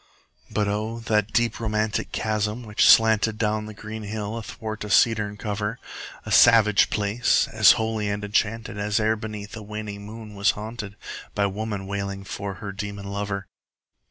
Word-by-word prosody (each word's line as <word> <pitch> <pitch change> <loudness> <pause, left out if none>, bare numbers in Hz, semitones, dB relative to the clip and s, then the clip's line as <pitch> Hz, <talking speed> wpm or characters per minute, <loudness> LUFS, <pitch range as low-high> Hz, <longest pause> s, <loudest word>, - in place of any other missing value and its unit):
But 105 -1 0
O, 105 +3 -2
that 105 -2 +1
deep 120 -2 +1
romantic 110 -1 -1
chasm 110 +2 -1
which 105 -2 +3
slanted 110 -1 +5
Down 110 -1 -1
the 110 - -8
green 110 +1 -7
hill 105 +1 -4
athwart 110 -1 -6
a 105 - -6
cedarn 105 0 +3
cover! 105 +2 -3 0.5
A 110 - -6
savage 105 -1 +6
place! 105 +3 +2
as - - +7
holy 110 -2 -1
and 100 0 -3
enchanted 105 0 -1
As 105 +2 0
e'er 110 +1 +2
beneath 105 -1 -7
a 110 - -7
waning 105 -1 -6
moon 110 0 -9
was 100 0 +1
haunted 105 -1 -6
15 - - -30 0.4
By 100 - +2
woman 100 0 -3
wailing 100 0 -4
for 100 0 -5
her 100 +2 -6
demon 100 0 -6
lover! 100 -1 -3
105 Hz, 165 wpm, -24 LUFS, 100-110 Hz, 0.5 s, as